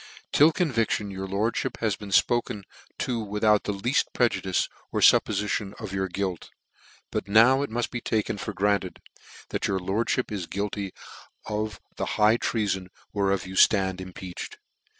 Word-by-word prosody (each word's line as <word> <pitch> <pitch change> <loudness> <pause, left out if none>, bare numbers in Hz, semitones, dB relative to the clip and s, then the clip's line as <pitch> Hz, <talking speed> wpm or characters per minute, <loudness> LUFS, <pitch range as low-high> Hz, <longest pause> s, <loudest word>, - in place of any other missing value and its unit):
" - - -32
Till 150 +3 +7
conviction, 115 - 0
your 95 0 -5
lordmip 110 +6 -1
has 110 -4 0
been 105 0 -9
fpoke 105 +1 +2 0.3
to 120 -2 -1
without 105 0 +2
the - - 0
lean: 100 +6 -2 0.2
prejudice, 100 -6 +1 0.2
or - - -1
fuppofition 105 0 +3
of 105 -4 -6
your 95 0 0
guilt 95 -1 -3 0.3
\ - - -28
but - - -2
now 115 +6 +6
it 140 - -2
mud 120 +2 -2
be 120 - -4
taken 110 -3 -1
for - - -4
granted, 100 -2 0 0.5
chat - - -1
your 95 - 0
lordfhip 105 +7 -1
is 95 -5 -3
guilty 100 0 -3 0.5
of 105 -2 -3 0.2
the - - -1
high 105 +2 +5
treafori 100 -5 -1 0.3
whereof 100 -2 +1
you 95 - -8
fland 95 -1 +4
impeached. 95 -1 -7
105 Hz, 160 wpm, -26 LUFS, 95-115 Hz, 0.5 s, Till